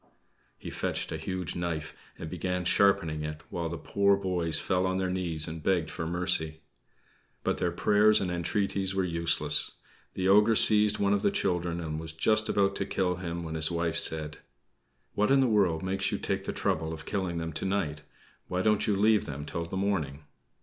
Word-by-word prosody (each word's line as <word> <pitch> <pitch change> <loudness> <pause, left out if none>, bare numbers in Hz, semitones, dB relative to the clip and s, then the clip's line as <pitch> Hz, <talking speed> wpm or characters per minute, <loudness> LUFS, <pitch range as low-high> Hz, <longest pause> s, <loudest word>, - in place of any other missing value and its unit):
He - - -8
fetched - - -3
a - - -3
huge 95 -2 -4
knife 85 -3 -4 0.2
and 80 - -7
began 90 +1 -3
sharpening 85 -5 +2
it, 75 0 -6
while 85 -1 -3
the 85 - -5
poor 100 +3 +2
boys 90 -5 +1
fell 95 +1 +1
on 95 0 -1
their 95 -1 -1
knees 85 -4 -1
and 80 0 -6
begged 85 -2 0
for 80 -2 -5
mercy. 85 -2 -1 0.8
But - - -1
their 90 - 0
prayers 105 +4 +3
and 90 -2 -2
entreaties 95 +2 -1
were 95 - +1
useless. 85 -2 +2 0.4
The 95 - -1
ogre 105 +3 +5
seized 105 -1 +5
one 100 0 +1
of 100 - +1
the - - +2
children 90 -2 -1
and 80 -2 -4
was 80 -1 -7
just 110 +7 +2
about 100 -1 +1
to 100 - -2
kill 90 -3 -1
him, 85 -1 -5
when 80 -1 -6
his 80 -1 +4
wife 85 -1 -1
said 80 -2 0 0.7
"What 105 +1 +1
in 135 0 +4
the 135 - +4
world 95 -8 +1
makes 95 +1 -1
you - - -1
take - - -2
the - - -2
trouble 80 0 -2
of 80 -1 -9
killing 95 -4 -3
them 80 -1 -4
to - - -3
night? 85 -7 -2 0.5
Why 90 0 -2
don't 105 -1 +2
you 105 - +2
leave 105 +2 +2
them 75 0 -6
till 85 +2 -4
the 95 - -5
morning? 80 -8 -2
90 Hz, 200 wpm, -28 LUFS, 80-100 Hz, 0.8 s, ogre